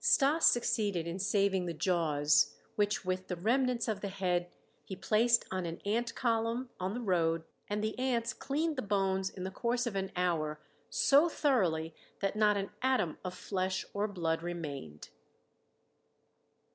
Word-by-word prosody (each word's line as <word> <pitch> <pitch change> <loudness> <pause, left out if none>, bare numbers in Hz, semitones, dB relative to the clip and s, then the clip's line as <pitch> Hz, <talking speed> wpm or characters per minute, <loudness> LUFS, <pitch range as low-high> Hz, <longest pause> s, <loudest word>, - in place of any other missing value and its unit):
Stas 300 +3 +4
succeeded 205 -7 +1
in 170 +3 -4
saving 195 -2 +1
the 170 - -3
jaws, 150 -4 +2 0.2
which 205 -2 0
with 185 0 -2
the 180 - -2
remnants 240 +5 +1
of 210 -3 -2
the 200 - -2
head 180 -2 -1 0.3
he 190 - -7
placed 230 +5 +3
on 185 -2 -2
an 165 +1 -6
ant 230 +3 -1
column 235 +1 0
on 185 +3 -2
the - - -3
road, 165 -6 +1 0.3
and 210 +1 -1
the 215 +3 -2
ants 240 -2 0
cleaned 305 +2 -2
the - - 0
bones 195 -2 0
in 185 - -8
the 190 - -4
course 240 +4 -1
of 235 -4 -3
an 190 0 -2
hour 160 -4 0 0.3
so 290 +5 +4
thoroughly 175 - +1 0.3
that 195 +1 -1
not 210 -1 +3
an 200 0 -3
atom 255 -11 +1
of 180 -1 -5
flesh 190 -1 -2
or 205 +1 0
blood 165 -5 -1
remained. 145 - -6
195 Hz, 160 wpm, -32 LUFS, 175-230 Hz, 0.3 s, Stas